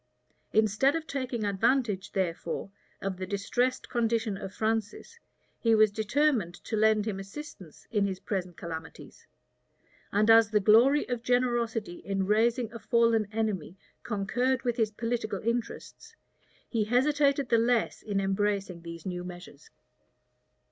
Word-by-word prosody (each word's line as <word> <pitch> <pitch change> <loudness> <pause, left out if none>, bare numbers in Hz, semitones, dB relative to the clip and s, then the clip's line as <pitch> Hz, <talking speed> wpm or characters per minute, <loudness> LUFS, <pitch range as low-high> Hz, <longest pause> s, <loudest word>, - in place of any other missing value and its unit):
Instead 220 +6 +3
of 325 -1 -3
taking 255 -6 -3
advantage, 205 -1 0
therefore, 190 +1 -2 0.3
of 195 -1 -2
the 185 0 -5
distressed 245 +6 -1
condition 230 -3 0
of 195 0 -7
Francis, 225 - -3 0.4
he 230 -1 +3
was 215 -1 +5
determined 220 - +1
to 220 - -5
lend 215 -1 +3
him 205 -3 -3
assistance 195 - -10
in 205 -3 +2
his 190 -1 -4
present 180 -4 -4
calamities; 160 -1 -9 0.8
and 215 +2 +4
as 225 -1 +7
the 215 -1 +3
glory 235 +8 +5
of 245 -2 -3
generosity 235 -5 0
in 195 -1 -2
raising 230 +3 +1
a 230 - -7
fallen 230 -2 +2
enemy 210 -5 -2 0.2
concurred 240 +5 -1
with 240 -2 0
his 220 -3 +2
political 225 -1 -3
interests, 240 - -4 0.5
he 225 -3 0
hesitated 280 +3 +2
the 230 - +4
less 235 0 +1
in 205 -2 -2
embracing 195 -2 -1
these 170 -1 -9
new 180 -1 -4
measures. 175 -5 -11
220 Hz, 135 wpm, -29 LUFS, 195-240 Hz, 0.8 s, as